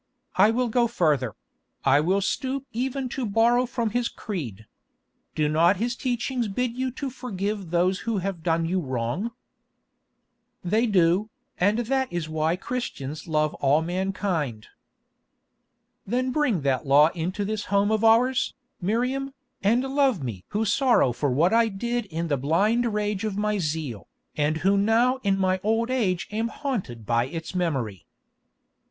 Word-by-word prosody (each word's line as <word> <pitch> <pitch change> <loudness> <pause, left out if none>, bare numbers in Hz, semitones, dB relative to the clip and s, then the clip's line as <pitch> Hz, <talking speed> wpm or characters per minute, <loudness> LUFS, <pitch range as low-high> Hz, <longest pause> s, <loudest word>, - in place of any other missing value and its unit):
I 200 +3 +6
will 245 +2 +1
go 235 +1 +2
further; 150 - +1 0.5
I 135 +1 +5
will 185 +6 +2
stoop 265 +6 -2
even 260 +3 -2
to 265 - -4
borrow 235 +3 +3
from 235 -2 -2
His 240 +1 0
creed. 125 - -6 0.7
Do 155 -1 +2
not 165 +5 +3
His 235 +4 -1
teachings 245 -1 -1
bid 240 +4 -2
you 260 +1 -1
to 270 0 -4
forgive 205 -6 -4
those 180 +3 +2
who 230 -2 -2
have 190 -2 -3
done 165 0 +1
you 185 +3 0
wrong?" 130 - -2 1.3
"They 215 +7 +2
do, 190 +1 +3 0.3
and 205 +4 +3
that 265 +2 0
is 175 -2 -3
why 155 +1 0
Christians 170 - -5
love 155 -1 +1
all 145 +3 +3
mankind." 175 - -2 1.4
"Then 255 +4 0
bring 250 - +1
that 135 +1 0
law 145 +3 +6
into 180 +4 -3
this 215 0 -3
home 200 +1 +2
of 220 0 +1
ours, 240 +3 +3 0.3
Miriam, 255 +8 -1 0.3
and 230 +6 +3
love 270 - +1
me 105 -8 -5
who 215 +2 -1
sorrow 235 - +3
for 130 +4 -1
what 160 - +2
I 230 0 +5
did 235 +3 -2
in 170 -1 -3
the 145 -3 +1
blind 210 - +2
rage 210 -1 -1
of 210 -3 -2
my 210 0 0
zeal, 150 - -3 0.3
and 150 +1 +1
who 200 +1 +4
now 230 +5 +3
in 195 -3 +1
my 185 -1 +1
old 225 +4 0
age 195 -9 0
am 220 +2 -1
haunted 215 - -4
by 115 +2 +2
its 165 +4 -6
memory." 135 - -2
200 Hz, 155 wpm, -25 LUFS, 160-235 Hz, 1.4 s, I